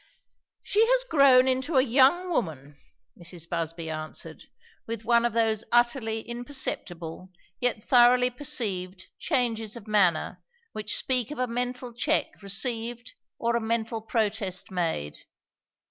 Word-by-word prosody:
"She 425 +2 +3
has - - +3
grown 275 - +5
into 265 +3 0
a 260 - +6
young 275 +8 +3
woman," 150 - -3 0.4
Mrs. 175 -1 -7
Busby 165 -1 -3
answered, 155 0 -5 0.4
with 225 -1 -5
one 235 0 +4
of 240 - 0
those 225 -2 +1
utterly 240 -2 +1
imperceptible, 205 - -4 0.3
yet 245 -4 -1
thoroughly 250 0 +5
perceived, 190 -8 -3
changes 230 -7 0
of 230 -2 -11
manner 190 -7 +2 0.3
which 215 0 0
speak 250 -4 0
of 300 - -7
a 255 - +1
mental 245 0 -4
check 235 - -1
received 230 +4 -3 0.2
or 235 0 0
a 235 - +1
mental 225 0 -2
protest 215 -5 -1
made. 165 - -2
230 Hz, 130 wpm, -27 LUFS, 195-250 Hz, 0.4 s, a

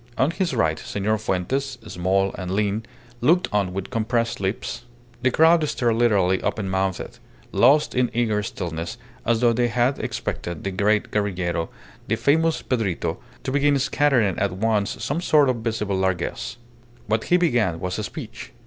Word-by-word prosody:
On 135 +5 +3
his 175 0 -1
right, 80 -1 +1
Senor 105 +2 -1
Fuentes, 130 +8 -2
small 95 0 0
and 90 -2 -5
lean, 105 +3 0 0.4
looked 170 +9 +3
on 100 -3 +1
with 95 +4 -5
compressed 115 0 0
lips. 95 +2 -3 0.4
The 130 - +3
crowd 160 +4 +5
stared 120 -2 +1
literally 100 -6 +3
open 100 -3 -2
mouthed, 95 -1 -2 0.3
lost 145 +5 +4
in 125 -1 +2
eager 110 -3 +1
stillness, 85 -4 -5 0.3
as 115 0 +2
though 120 -1 +4
they 120 +1 +2
had 125 +3 +1
expected 85 -2 -4
the 100 - -2
great 105 +3 +1
guerrillero, 90 -5 -1 0.4
the - - +1
famous 160 +3 +2
Pedrito, 110 -9 -1 0.2
to - - -2
begin 145 +1 +3
scattering 130 -7 +2
at 100 -2 0
once 105 +3 0
some 145 +8 -1
sort 150 -5 +4
of 125 - +1
visible 110 -3 -2
largesse. 95 +4 -2 0.5
What 110 +2 0
he 180 - +4
began 120 - +1
was 90 +2 -3
a - - -2
speech. 115 0 -8
110 Hz, 160 wpm, -23 LUFS, 95-130 Hz, 0.5 s, crowd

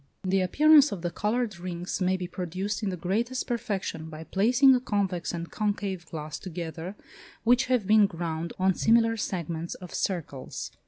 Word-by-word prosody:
The 190 0 +2
appearance 295 - +6
of 180 -4 -5
the 175 - -1
coloured 210 0 -1
rings 175 +1 -4
may 185 +1 +2
be 180 - -4
produced 185 +4 -3
in 210 - -1
the 185 - -4
greatest 230 +9 -1
perfection 200 -8 -3
by 155 0 -8
placing 245 - +4
a 250 - +3
convex 195 -7 -1
and 170 -1 -5
concave 200 -4 -2
glass 155 -1 -6
together 170 +1 -6 0.5
which 245 +3 +4
have 250 -5 +1
been 210 0 +6
ground 165 -2 -4
on 190 0 +3
similar 225 +3 +3
segments 170 -5 -3
of 180 -2 -10
circles. 160 -8 -3
190 Hz, 165 wpm, -27 LUFS, 170-220 Hz, 0.5 s, appearance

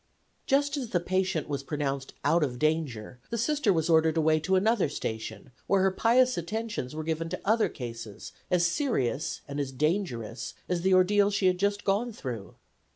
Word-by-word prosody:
Just 285 +1 +2
as 255 -5 -4
the 180 - +1
patient 185 -1 -1
was 140 -2 -2
pronounced 140 -2 -3
out 160 +3 +4
of 125 -4 -2
danger 140 -7 -1
the 230 - -2
Sister 280 -1 +2
was 160 -3 +1
ordered 160 -1 +4
away 155 0 +3
to 190 +5 +1
another 205 -2 +2
station, 110 -4 -5 0.2
where 195 -1 +3
her 190 - +3
pious 245 +3 +3
attentions 210 - -4
were 155 - -3
given 165 +1 -2
to - - -5
other 220 +2 +3
cases 115 -4 -8 0.2
as 180 -2 +3
serious 170 - -1
and 140 0 -4
as 140 -2 -2
dangerous 130 - -2
as 180 -1 -1
the 190 +1 +4
ordeal 200 +2 +4
she 200 -1 0
had 180 -1 +3
just 200 +1 0
gone 210 +5 +1
through. 120 - -7
170 Hz, 180 wpm, -28 LUFS, 140-205 Hz, 0.2 s, out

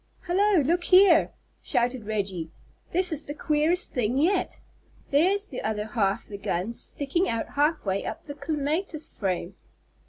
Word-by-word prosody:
"Hallo, 375 0 +3
look 345 +5 +1
here!" 370 -3 +6 0.3
shouted 240 -2 -1
Reggie. 195 -6 -2 0.4
"This 365 +1 +2
is 310 -1 -3
the 290 - -6
queerest 310 +4 0
thing 245 0 0
yet. 360 +6 +1 0.5
There's 380 +8 +3
the 255 - -4
other 215 -1 -2
half 210 -3 0
the 200 -1 -8
gun 190 +4 -2
sticking 290 +9 -2
out 230 -1 -2
half 300 0 +1
way 195 0 -1
up - - -6
the 290 - -6
clematis 310 +3 -3
frame!" 185 -2 -3
290 Hz, 150 wpm, -26 LUFS, 215-345 Hz, 0.5 s, here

